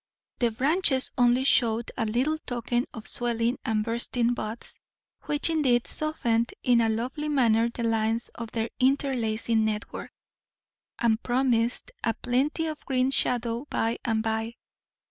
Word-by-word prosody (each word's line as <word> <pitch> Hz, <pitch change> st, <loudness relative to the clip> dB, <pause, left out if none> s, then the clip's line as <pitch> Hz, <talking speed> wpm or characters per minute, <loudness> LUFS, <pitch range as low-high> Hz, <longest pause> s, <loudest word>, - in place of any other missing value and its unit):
The 240 Hz, -, +3 dB
branches 270 Hz, +3 st, +1 dB
only 245 Hz, 0 st, +4 dB
showed 235 Hz, -3 st, +2 dB
a 225 Hz, -3 st, -1 dB
little 260 Hz, +8 st, 0 dB
token 240 Hz, -2 st, -2 dB
of 220 Hz, -, -9 dB
swelling 235 Hz, 0 st, 0 dB
and 220 Hz, -4 st, 0 dB
bursting 235 Hz, +1 st, 0 dB
buds, 225 Hz, -1 st, -6 dB, 0.5 s
which 295 Hz, 0 st, +1 dB
indeed 275 Hz, -7 st, +2 dB
softened 235 Hz, -7 st, -1 dB
in 245 Hz, -2 st, +4 dB
a 225 Hz, -, +2 dB
lovely 255 Hz, +7 st, -2 dB
manner 235 Hz, -5 st, +3 dB
the 235 Hz, 0 st, -5 dB
lines 225 Hz, 0 st, 0 dB
of 230 Hz, -1 st, -6 dB
their 225 Hz, 0 st, -2 dB
interlacing 235 Hz, -4 st, +1 dB
network, 215 Hz, 0 st, -3 dB, 0.9 s
and 230 Hz, -1 st, +2 dB
promised 245 Hz, -, +1 dB
a 225 Hz, -2 st, +1 dB
plenty 270 Hz, +8 st, 0 dB
of 310 Hz, -2 st, -5 dB
green 260 Hz, 0 st, +1 dB
shadow 240 Hz, 0 st, 0 dB
by 225 Hz, +1 st, -1 dB
and 220 Hz, -1 st, 0 dB
by. 225 Hz, +1 st, -2 dB
240 Hz, 140 wpm, -27 LUFS, 225-260 Hz, 0.9 s, only